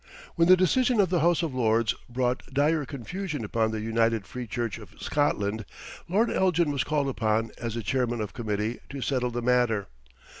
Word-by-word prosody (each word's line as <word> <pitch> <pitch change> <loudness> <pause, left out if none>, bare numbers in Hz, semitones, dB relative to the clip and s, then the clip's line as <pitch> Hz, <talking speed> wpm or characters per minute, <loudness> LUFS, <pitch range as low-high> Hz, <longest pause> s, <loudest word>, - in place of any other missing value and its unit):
When 170 -1 +3
the 185 +1 +8
decision 240 +6 +3
of 190 -3 +4
the 175 - +3
House 170 +2 +3
of 160 -5 -2
Lords 115 -4 +2 0.2
brought 125 +1 0
dire 145 +2 +2
confusion 150 - -5
upon 110 +1 0
the 110 -1 -3
United 115 -1 +1
Free 125 +3 -6
Church 115 0 -3
of 105 - -14
Scotland, 110 -7 0 0.5
Lord 215 +6 +2
Elgin 175 -4 +2
was 140 -2 0
called 145 -2 0
upon 110 -3 0
as 115 -1 -4
the 115 - -3
Chairman 120 +3 0
of 105 -2 -4
Committee 110 -1 -2
to 140 -1 -6
settle 125 -1 0
the 120 0 -4
matter. 120 -5 +2
125 Hz, 185 wpm, -27 LUFS, 110-150 Hz, 0.5 s, the